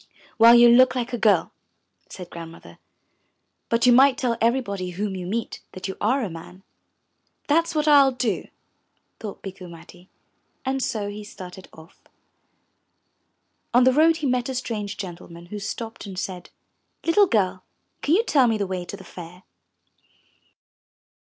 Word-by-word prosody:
Well, 230 Hz, +1 st, +8 dB
you 240 Hz, 0 st, +8 dB
look 255 Hz, +2 st, +5 dB
like 245 Hz, -1 st, -3 dB
a -, -, 0 dB
girl," 200 Hz, -7 st, +3 dB, 0.6 s
said 180 Hz, -2 st, -10 dB
Grandmother, 165 Hz, -, -11 dB, 0.9 s
but 230 Hz, +1 st, +2 dB
you 250 Hz, -, +6 dB
might 265 Hz, +1 st, +5 dB
tell 245 Hz, -3 st, 0 dB
everybody 225 Hz, -6 st, 0 dB
whom 195 Hz, +2 st, -4 dB
you 180 Hz, -1 st, -6 dB
meet 225 Hz, +4 st, -4 dB
that 185 Hz, -, -6 dB
you 190 Hz, -, -5 dB
are 255 Hz, +6 st, +1 dB
a -, -, -2 dB
man." 175 Hz, +3 st, -11 dB, 0.8 s
'That's 330 Hz, +3 st, +1 dB
what 305 Hz, 0 st, 0 dB
I 290 Hz, -2 st, +7 dB
will 270 Hz, -, +2 dB
do," 245 Hz, -5 st, -2 dB, 0.7 s
thought 210 Hz, -3 st, -8 dB
Bikku 190 Hz, -2 st, -9 dB
Matti, 175 Hz, +2 st, -15 dB, 0.6 s
and 265 Hz, 0 st, -1 dB
so 215 Hz, -5 st, -2 dB
he 205 Hz, +1 st, -7 dB
started 190 Hz, -2 st, -11 dB
off. 160 Hz, +1 st, -17 dB, 1.7 s
On 245 Hz, -, +6 dB
the 260 Hz, +1 st, +4 dB
road 320 Hz, +3 st, +4 dB
he 310 Hz, -, -4 dB
met 250 Hz, 0 st, 0 dB
a 260 Hz, -, -4 dB
strange 215 Hz, -5 st, -4 dB
gentleman 170 Hz, -3 st, -9 dB
who 210 Hz, -, -4 dB
stopped 225 Hz, +1 st, -6 dB
and 190 Hz, -2 st, -8 dB
said, 180 Hz, -1 st, -5 dB, 0.5 s
'Tittle 395 Hz, +5 st, +4 dB
girl, 190 Hz, -, 0 dB, 0.4 s
can 305 Hz, -, +2 dB
you 440 Hz, -, +3 dB
tell 275 Hz, -, +3 dB
me 225 Hz, -1 st, +1 dB
the 200 Hz, -, -1 dB
way 185 Hz, -1 st, -4 dB
to 200 Hz, -, -8 dB
the 190 Hz, -, -13 dB
Fair?" 180 Hz, 0 st, -11 dB
215 Hz, 160 wpm, -23 LUFS, 185-255 Hz, 1.7 s, Well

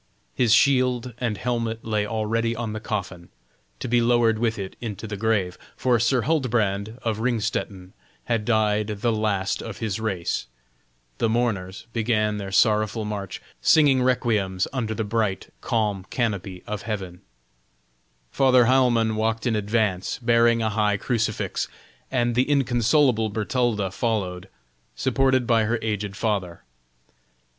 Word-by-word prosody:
His 115 Hz, -, +2 dB
shield 125 Hz, 0 st, +3 dB
and 115 Hz, -4 st, -1 dB
helmet 115 Hz, -2 st, -2 dB
lay 105 Hz, -2 st, 0 dB
already 115 Hz, +1 st, -1 dB
on 115 Hz, -2 st, -4 dB
the 110 Hz, -, -4 dB
coffin, 95 Hz, -5 st, -5 dB, 0.5 s
to -, -, -4 dB
be 120 Hz, 0 st, +3 dB
lowered 115 Hz, -2 st, +3 dB
with 115 Hz, -1 st, 0 dB
it 95 Hz, -2 st, -6 dB
into 110 Hz, -2 st, -5 dB
the 105 Hz, -1 st, -5 dB
grave, 100 Hz, -4 st, 0 dB, 0.2 s
for 125 Hz, -2 st, +2 dB
Sir 115 Hz, +1 st, +2 dB
Huldbrand, 110 Hz, -8 st, 0 dB
of 110 Hz, -2 st, -1 dB
Ringstetten, 105 Hz, -5 st, -2 dB, 0.3 s
had 115 Hz, -3 st, -1 dB
died 105 Hz, -2 st, +1 dB
the 105 Hz, +2 st, -1 dB
last 105 Hz, -3 st, -1 dB
of 110 Hz, -3 st, -7 dB
his 110 Hz, -2 st, -3 dB
race; 95 Hz, -, -2 dB, 0.7 s
the 115 Hz, -, +2 dB
mourners 110 Hz, -4 st, -1 dB
began 110 Hz, -2 st, +1 dB
their 100 Hz, -1 st, -5 dB
sorrowful 110 Hz, +2 st, +2 dB
march, 100 Hz, -3 st, -5 dB, 0.2 s
singing 145 Hz, -5 st, +5 dB
requiems 110 Hz, -7 st, +1 dB
under 115 Hz, -4 st, -2 dB
the 110 Hz, -, -1 dB
bright, 105 Hz, -2 st, -2 dB
calm 105 Hz, -5 st, -1 dB
canopy 100 Hz, -6 st, -2 dB
of 105 Hz, -1 st, -4 dB
heaven; 95 Hz, -5 st, -5 dB, 1.1 s
Father 130 Hz, -3 st, +4 dB
Heilmann 120 Hz, -3 st, +3 dB
walked 110 Hz, +2 st, -1 dB
in 120 Hz, -3 st, +1 dB
advance, 105 Hz, -3 st, 0 dB
bearing 115 Hz, -1 st, +3 dB
a 110 Hz, -, +1 dB
high 105 Hz, -1 st, +1 dB
crucifix, 115 Hz, -1 st, -1 dB, 0.4 s
and 120 Hz, -2 st, +1 dB
the 125 Hz, +4 st, +1 dB
inconsolable 120 Hz, -3 st, +2 dB
Bertalda 105 Hz, -2 st, -1 dB
followed, 95 Hz, -4 st, -2 dB, 0.5 s
supported 130 Hz, -1 st, +2 dB
by 115 Hz, -2 st, +3 dB
her 115 Hz, +3 st, 0 dB
aged 105 Hz, -2 st, -2 dB
father. 100 Hz, -5 st, -2 dB
110 Hz, 135 wpm, -24 LUFS, 105-120 Hz, 1.1 s, singing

